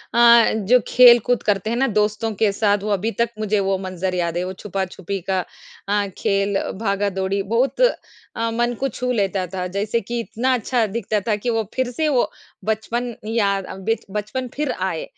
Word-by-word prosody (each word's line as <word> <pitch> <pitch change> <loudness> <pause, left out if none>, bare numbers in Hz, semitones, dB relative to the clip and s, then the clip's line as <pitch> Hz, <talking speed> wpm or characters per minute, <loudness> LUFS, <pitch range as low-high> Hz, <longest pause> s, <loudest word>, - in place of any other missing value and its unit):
अ, 235 -1 +7
जो 220 +4 +4
खेलकूद 245 -1 +6
करते 205 0 0
हैं 235 - -1
ना, 270 +2 +2
दोस्तों 215 0 0
के 215 -2 +4
साथ 205 0 +1
वो 210 - -2
अभी 205 +3 0
तक 235 - +2
मुझे 215 -1 +1
वो 195 0 +1
मंज़र 185 -1 -3
याद 170 -1 -1
है, 175 - 0
वो 185 +1 -4
छुपा 195 0 -3
छुपी 190 +1 -5
का 190 -1 +2 0.5
अ, 205 0 +1
खेल 200 0 +1 0.2
भागा-दौड़ी 200 -2 -1
बहुत 235 - 0
अ, 230 - -1
मन 240 +1 0
को 275 - +1
छू 250 0 -3
लेता 195 -5 0
था। 185 -1 -2
जैसे 205 +5 -1
कि 235 +4 -4
इतना 240 +3 -1
अच्छा 245 -1 +1
दिखता 215 0 -1
था 215 - +2
कि 210 +4 -3
वो 225 -1 +1
फिर 260 -1 -1
से 310 +6 -1
वो 260 -4 +2 0.4
बचपन 230 +2 -2
याद 200 -4 +1
अ, - - -8
बिच 210 +4 -2
बचपन 215 +5 -3
फिर 295 -2 -1
आए 185 -3 -2
215 Hz, 195 wpm, -21 LUFS, 195-235 Hz, 0.5 s, अ